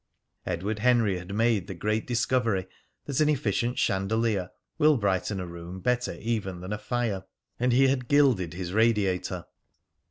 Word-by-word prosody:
Edward 95 +5 -2
Henry 115 -5 +3
had 90 +2 -9
made 110 -4 +2
the 95 - -6
great 105 +5 -1
discovery 115 -5 +1 0.4
that 140 -3 -2
an 155 -1 +4
efficient 120 -3 0
chandelier 95 -1 0 0.3
will 150 -1 +5
brighten 100 -1 0
a 90 - -4
room 85 +1 -8
better 125 +4 0
even 105 -6 -3
than 90 +3 -5
a 105 - -4
fire; 105 -4 -2 0.3
and 125 +1 +2
he 135 +3 +5
had 130 -2 0
gilded 125 - +3
his 90 0 -5
radiator. 105 -4 +1
110 Hz, 155 wpm, -27 LUFS, 95-120 Hz, 0.4 s, will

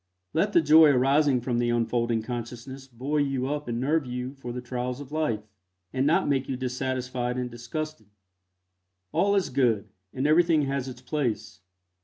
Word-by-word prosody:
Let 200 +6 +1
the 170 - +5
joy 155 +1 +8
arising 135 0 +3
from 120 0 -1
the 120 0 +1
unfolding 120 -1 0
consciousness 125 +3 -6
buoy 135 +4 -1
you 135 -2 -1
up 150 +1 -3
and 120 -1 -2
nerve 145 +2 +1
you 125 +1 -4
for 135 -3 -7
the 125 - -4
trials 125 +1 -4
of 145 -1 -9
life, 150 -9 -1 0.5
and 130 +2 +1
not 170 +5 +3
make 135 -2 0
you 130 - -2
dissatisfied 125 -1 -2
and 125 -1 -3
disgusted. 120 0 -6 1.0
All 200 +1 +2
is 195 -3 +1
good, 115 -6 +1 0.2
and 130 +2 -2
everything 160 0 +4
has 135 -1 -2
its 125 -1 -9
place. 130 -4 -2
130 Hz, 170 wpm, -27 LUFS, 120-145 Hz, 1.0 s, joy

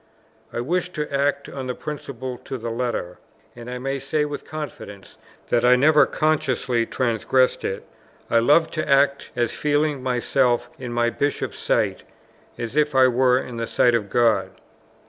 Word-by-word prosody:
I 120 - -3
wished 180 +7 -2
to 150 -2 -4
act 140 0 0
on 135 -2 -6
this 125 - -4
principle 130 -4 -6
to 135 - -4
the 115 -1 -5
letter, 115 -7 -3 0.4
and 120 0 -9
I 125 - -4
may 135 +2 -3
say 150 +3 -1
with 145 -1 -6
confidence 140 -10 -8 0.3
that 120 -1 +2
I 125 +1 +6
never 150 +4 +5
consciously 130 -6 0
transgressed 130 +1 +1
it. 95 - -4 0.4
I 115 - +3
loved 150 +7 +3
to 155 -2 -3
act 140 0 +3
as 120 -2 0
feeling 150 -1 0
myself 125 0 +1
in 125 -2 -6
my 120 0 +1
Bishop's 145 +3 -2
sight, - - 0 0.6
as 120 +2 -5
if 150 -2 +2
it 130 -1 +6
were 125 0 +2
the 115 -1 -4
sight 120 - +3
of 105 -4 0
God. 115 -1 +2
130 Hz, 165 wpm, -23 LUFS, 120-145 Hz, 0.6 s, I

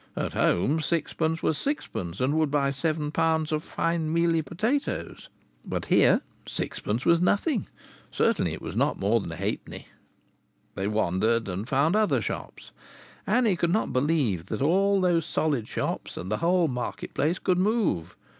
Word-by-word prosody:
At - - -2
home 135 - +2
sixpence 160 +1 -1
was 155 - +1
sixpence, 95 - -3
and 130 +3 +1
would 155 -2 +2
buy 140 -1 +1
seven 150 +1 -1
pounds 160 -1 +1
of 155 0 -1
fine 165 -2 -1
mealy 165 0 +2
potatoes; 225 - -2 0.3
but - - -4
here - - +4 0.3
sixpence 110 +4 -3
was 170 0 +4
nothing 210 - +1 0.4
certainly - - +1
it - - -7
was - - -6
not - - +1
more 105 +4 +2
than 95 - -6
a - - -5
halfpenny. 100 +5 -5 0.8
They 95 - -2
wandered 110 +2 +1
and 100 +5 -4
found 145 +7 +2
other 215 -1 +3
shops. - - -6 0.6
Annie 235 -6 +3
could 170 0 0
not 215 - 0
believe 130 - +1
that 110 +6 -2
all 195 +6 +3
those 175 -3 +2
solid 145 -8 -1
shops - - -3
and 95 - -5
the 105 - +1
whole 175 +2 +2
market 125 -3 -4
place 155 +6 +1
could 180 -1 +1
move. 185 - 0
155 Hz, 160 wpm, -26 LUFS, 115-170 Hz, 0.8 s, here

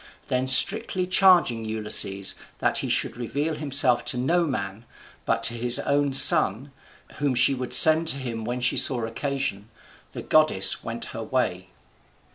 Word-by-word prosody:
Then 130 0 -3
strictly 185 +7 +3
charging 180 -11 +1
Ulysses 105 -3 -1 0.2
that - - -2
he - - -6
should - - -3
reveal 145 +6 -5
himself 140 -4 +1
to - - -2
no 170 +7 -2
man, 105 -5 -7 0.4
but 115 0 -2
to 115 0 +1
his 120 +1 +2
own 145 0 -2
son, 135 - +5 0.5
whom 140 -3 -3
she 130 +3 +2
would 125 -1 -7
send 160 +1 +5
to 140 - -1
him 120 -4 -8
when 120 +2 -6
she 125 - -2
saw 120 -4 +2
occasion, 115 -4 -6 0.4
the - - -9
goddess 155 -12 +2
went 115 0 -8
her 115 - -8
way. 95 -6 -5
125 Hz, 155 wpm, -22 LUFS, 115-145 Hz, 0.5 s, son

